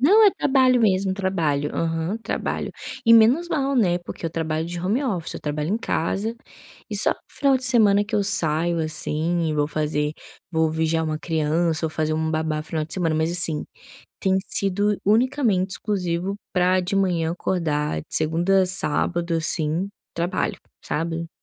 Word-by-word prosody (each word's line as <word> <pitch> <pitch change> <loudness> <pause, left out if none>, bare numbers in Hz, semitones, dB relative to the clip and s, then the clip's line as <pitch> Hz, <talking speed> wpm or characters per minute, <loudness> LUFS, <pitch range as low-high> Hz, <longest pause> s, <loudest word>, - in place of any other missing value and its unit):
Não 410 - +6
é 410 - +7
trabalho 260 -6 +3
mesmo 195 -3 +2
trabalho, 165 -7 -1
aham, 165 +4 -1
trabalho - - -3 0.3
e 230 - +6
menos 245 +10 +5
mal, 275 -3 0
né, 180 -8 +3
porque 175 0 -9
eu 165 - -1
trabalho 160 -1 -2
de 175 +1 -5
home 205 +10 0
office, 190 - -2
eu - - -6
trabalho 150 +2 -2
em - - +1
casa, 215 +2 -2 0.5
e - - -3
só - - +3 0.2
final 275 -2 +2
de 255 - -6
semana 210 -4 +4
que 215 - -5
eu 205 - +3
saio 170 -3 +1
assim 160 +1 -1
e - - -1
vou 145 -1 +1
fazer 150 0 -1 0.4
vou 160 -1 +2
vigiar 160 0 0
uma 155 -1 -2
criança 160 +1 0
ou 160 - 0
fazer 155 0 -1
uma 160 0 -1
babá 155 -1 -1
final 155 -1 -3
de 160 - -8
semana, 170 -4 0
mas 160 +2 0
assim 170 -3 0 0.5
tem 190 -1 +2
sido 205 +1 0
unicamente 220 -4 +2
exclusivo 185 -2 -2 0.2
para 185 0 +3
de 185 +2 -2
manhã 175 -4 +1
acordar 155 - -1
de - - -15
segunda 175 +5 +2
a - - +1
sábado, 175 -1 -1
assim, 165 +2 0 0.2
trabalho, 175 +3 -1 0.3
sabe. 165 +2 -3
175 Hz, 170 wpm, -23 LUFS, 160-200 Hz, 0.5 s, é